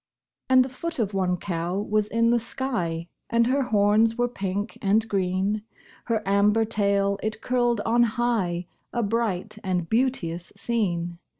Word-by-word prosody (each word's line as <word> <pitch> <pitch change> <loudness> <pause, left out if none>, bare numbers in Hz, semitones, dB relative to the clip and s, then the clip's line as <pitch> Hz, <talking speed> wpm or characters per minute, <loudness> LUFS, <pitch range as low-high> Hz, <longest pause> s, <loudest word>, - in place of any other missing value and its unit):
And 255 -1 +6
the - - -6
foot 335 +6 -5
of 210 -4 -1
one 185 -2 +1
cow 175 0 -3
was 210 +1 0
in 230 +1 +2
the 240 - +3
sky, 200 -10 -3 0.2
And 235 0 +3
her 265 +3 +2
horns 220 -1 +3
were 245 0 +2
pink 200 -3 -4
and 215 +2 +2
green; 195 +1 0 0.4
Her 220 -4 -1
amber 205 +3 +3
tail 200 -2 +1
it 215 0 -3
curled 240 -3 +1
on 230 +3 +2 0.2
high 195 -8 0 0.3
A 240 - -1
bright 215 -2 -1
and 180 -3 -1
beauteous 190 -8 -1
scene. 175 -6 -2
210 Hz, 155 wpm, -25 LUFS, 190-235 Hz, 0.4 s, And